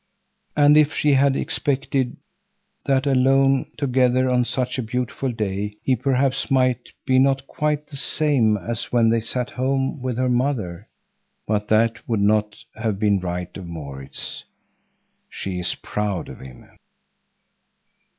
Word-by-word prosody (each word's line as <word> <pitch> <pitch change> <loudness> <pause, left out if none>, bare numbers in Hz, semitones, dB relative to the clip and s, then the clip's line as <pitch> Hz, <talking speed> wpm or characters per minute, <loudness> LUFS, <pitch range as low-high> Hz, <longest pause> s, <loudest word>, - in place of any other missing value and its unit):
And 145 0 +6
if 155 0 +4
she 150 -1 +3
had 135 0 +4
expected 135 -4 -1 0.7
that 135 0 +2
alone 135 0 +3
together 130 -1 +2
on 125 -1 +2
such 130 +1 -2
a - - +1
beautiful 125 +3 -2
day 105 -2 -3
he 130 - +2
perhaps 135 +2 0
might 130 -2 +1 0.2
be 130 -1 +4
not 135 0 +2
quite 150 0 -1
the 145 -2 -8
same 135 -7 +2
as 115 +4 -4
when 115 -2 +4
they 115 0 +3
sat 125 +2 -2
at - - -17
home 135 +1 0
with 125 -2 -3
her 130 0 +1
mother—but 110 -3 -3
that 115 +1 +1
would 115 -3 +1
not 105 +1 +2 0.2
have 110 -3 -2
been 100 -1 +2
right 90 0 -4
of 95 -3 -8
Maurits. 70 -5 -7 0.9
She 95 -2 -5
is 90 - -1
proud 105 -5 -3
of - - -10
him. 65 -2 -12
125 Hz, 140 wpm, -22 LUFS, 105-135 Hz, 0.9 s, And